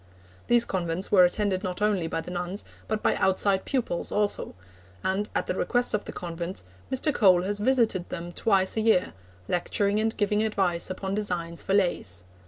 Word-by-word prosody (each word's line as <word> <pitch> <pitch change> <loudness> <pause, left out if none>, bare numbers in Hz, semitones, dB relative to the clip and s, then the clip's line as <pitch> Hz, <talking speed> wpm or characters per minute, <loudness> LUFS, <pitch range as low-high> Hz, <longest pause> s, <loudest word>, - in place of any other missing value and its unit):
These 240 -1 +4
convents 180 -2 -2
were 185 -3 +7
attended 190 +1 0
not 180 -2 -3
only 205 -5 +1
by 165 0 -2
the 180 - -8
nuns 180 +3 -4 0.2
but 215 -1 -2
by - - +3
outside 190 0 +2
pupils 245 -10 -2
also; 205 - -1 0.5
and, 200 +3 -1
at - - +1
the - - -1
request 245 +6 0
of 210 - -1
the - - -6
convents, 170 - -5 0.3
Mr. 270 +3 +1
Cole 185 -5 +5
has 205 +2 -1
visited 220 -6 +2
them 175 0 -5
twice 190 0 +2
a 220 - +1
year, 215 -5 +2 0.3
lecturing 200 +3 0
and 220 +1 -1
giving 210 0 +1
advice 195 -6 0
upon 190 +1 -4
designs 175 -5 -2
for 195 - 0
lace. 100 - 0
190 Hz, 180 wpm, -27 LUFS, 180-210 Hz, 0.5 s, were